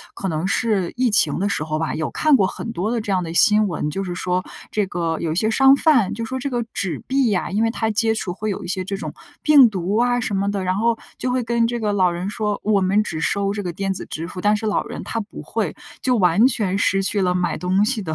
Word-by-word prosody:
可 - - -5
能 160 +1 -2
是 200 -3 0
疫 250 -1 +2
情 175 -8 +4
的 200 +2 0
时 150 - -1
候 155 0 -2
吧， 160 - -2
有 155 - -3
看 310 -1 +2
过 200 -8 +4
很 225 +4 -6
多 190 +4 -2
的 240 - 0
这 210 -3 -3
样 185 - +1
的 165 -1 -6
新 210 +5 +5
闻， 150 -3 -3
就 195 +6 -3
是 180 -2 -4
说 180 0 -1 0.3
这 210 -2 0
个 170 -3 -2
有 160 - -2
一 - - -2
些 215 +5 +1
商 270 +4 +5
贩， 275 - +3
就 230 +1 -4
说 260 +2 -4
这 260 - -3
个 240 -3 -2
纸 185 -4 -2
币 260 -3 +1
啊， 180 - -2
因 210 +3 0
为 225 - +2
它 220 -1 -1
接 220 +1 +2
触 200 -4 -3
会 215 +4 -5
有 200 - -4
一 - - -7
些 185 0 -1
这 195 +2 -4
种 195 - -6 0.3
病 285 -6 +7
毒 190 0 -2
啊 245 0 +2
什 230 - -2
么 200 +1 0
的， 200 -2 -3
然 185 0 0
后 230 +3 +1 0.2
就 255 - -2
会 250 0 0
跟 235 0 +1
这 240 0 -2
个 210 -2 -1
老 185 -3 +2
人 175 +3 -4
说： 210 -1 -2
“我 205 -2 +2
们 195 +3 +2
只 160 - -4
收 200 +3 0
这 205 - -4
个 180 - -3
电 195 +3 -2
子 - - -6
支 160 +1 -5
付。” 180 +1 -7
但 210 +2 +3
是 220 - -6
老 210 -1 0
人 - - -8
他 230 - -3
不 205 - -9
会， - - -3 0.3
就 250 -2 +2
完 180 +5 +4
全 205 -7 0
失 195 -1 +2
去 200 +1 +1
了 180 -1 +1
买 180 -1 -1
东 185 +3 +1
西 230 +1 +1
的 160 -3 -4
200 Hz, 300 characters per minute, -21 LUFS, 185-225 Hz, 0.3 s, 病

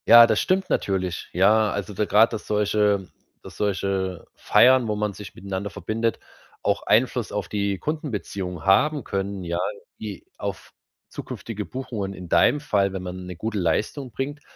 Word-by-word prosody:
Ja, 115 0 +10
das 110 -2 +2
stimmt 190 +1 +1
natürlich. 95 -3 -1
Ja, 105 +4 +4
also, 100 +1 -4
da 105 +2 0
grad, 110 +3 +4
dass 105 - -5
solche 105 -2 +2 0.4
dass - - -11
solche 95 -3 -1
Feiern, 130 -1 +5
wo 105 - 0
man 105 -1 -1
sich 100 -2 -10
miteinander 100 +1 -4
verbindet, 110 +4 -2 0.4
auch - - +1
Einfluss 120 0 +2
auf 105 -4 -3
die 100 -1 -1
Kundenbeziehungen 100 - -4
haben 145 +9 +4
können, 100 -1 -3
ja, 85 0 -2 0.4
wie 105 -4 -7
auf - - -6 0.4
zukünftige 105 -3 -6
Buchungen 110 -7 -5
in 90 -3 -9
deinem 145 - +4
Fall, 100 -9 +1
wenn 95 - -4
man 90 0 -6
'ne 90 0 -7
gute 110 +5 -3
Leistung 110 - -1
bringt. 145 +5 -4
105 Hz, 160 wpm, -24 LUFS, 95-115 Hz, 0.4 s, Ja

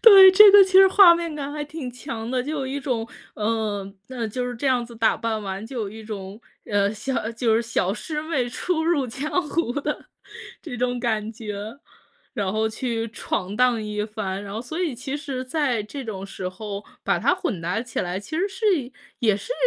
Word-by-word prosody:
对， 390 -4 +10
这 415 +1 +10
个 400 0 +9
其 380 - -7
实 385 +1 +9
画 380 -3 +8
面 335 -2 -3
感 285 -1 -4
还 295 0 -3
挺 295 -3 -6
强 235 -1 -6
的。 255 -1 0
就 295 - -4
有 280 -4 -2
一 275 +2 -3
种， 240 -4 -2 0.3
呃， 210 -2 -2 0.2
那 245 -3 -3
就 250 +3 -3
是 245 - -5
这 275 - -3
样 250 -2 +2
子 235 0 -12
打 225 0 +3
扮 225 -1 -2
完， 195 +1 -5
就 235 +1 -5
有 205 - -3
一 220 +1 -10
种， 205 -1 -7 0.2
呃， 205 0 +1
小 230 +1 -3
就 230 -1 +1
是 230 - +2
小 215 -5 0
师 300 +7 -4
妹 280 -7 -1
初 320 +5 -1
入 305 -6 +2
江 300 +9 -2
湖 305 -8 0
的 295 +2 -3 0.6
这 290 -7 -6
种 245 0 0
感 220 -2 -1
觉， 215 +2 -7 0.5
然 200 -2 -1
后 220 +1 +1
去 230 0 -2
闯 200 -3 -3
荡 245 -3 +3
一 210 0 -3
番。 200 -3 -4
然 200 - -8
后 225 - -3
所 315 +7 -6
以 320 -8 0
其 265 +4 -4
实 275 -4 -5
在 255 -5 0
这 270 +6 -7
种 195 -3 -5
时 185 -2 -5
候 200 +2 -7 0.2
把 - - +2
它 - - +3
混 220 - -3
搭 180 +7 -1
起 240 -2 -4
来， 180 +1 -2
其 205 +10 -6
实 390 +4 +1
是 385 +3 -7 0.5
也 215 -6 +3
是 - - -5
235 Hz, 230 characters per minute, -24 LUFS, 215-290 Hz, 0.6 s, 对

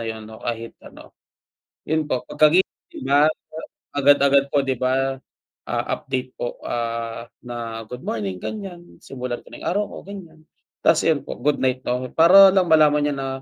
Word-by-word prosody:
'yun, 110 -1 -6
'no? 110 0 -12
Kahit 115 -1 -5
ano, - - -15 0.7
'yun 155 -1 -1
po 130 -4 -1
pagkagising 155 -4 +1
ba 145 +2 +5 0.7
agad-agad 140 0 +4
po, 145 - +4
'di 135 -1 -1
ba, 135 +1 0 0.5
ah, - - -1 0.2
update 130 -1 -4
po, 120 - -4
ah, 115 -1 -3 0.2
na 115 -2 -6
"Good 125 0 -8
morning," 100 -4 -3
ganyan, 185 -5 -8
simulan 125 -2 -5
ko - - -17
ng - - -10
araw 205 +4 +1
ko, - - -9
ganyan. 170 -6 -11 0.4
Tas 165 - +4
iyon 155 -4 +2
po, - - -6
good 150 0 0
night 130 0 0
na 125 +1 0
'ko, 130 - -6
para 190 +4 +8
lang 190 -2 +3
malaman 150 -2 +5
niya 145 - 0
na 135 -1 -4
135 Hz, 170 wpm, -22 LUFS, 120-155 Hz, 0.7 s, para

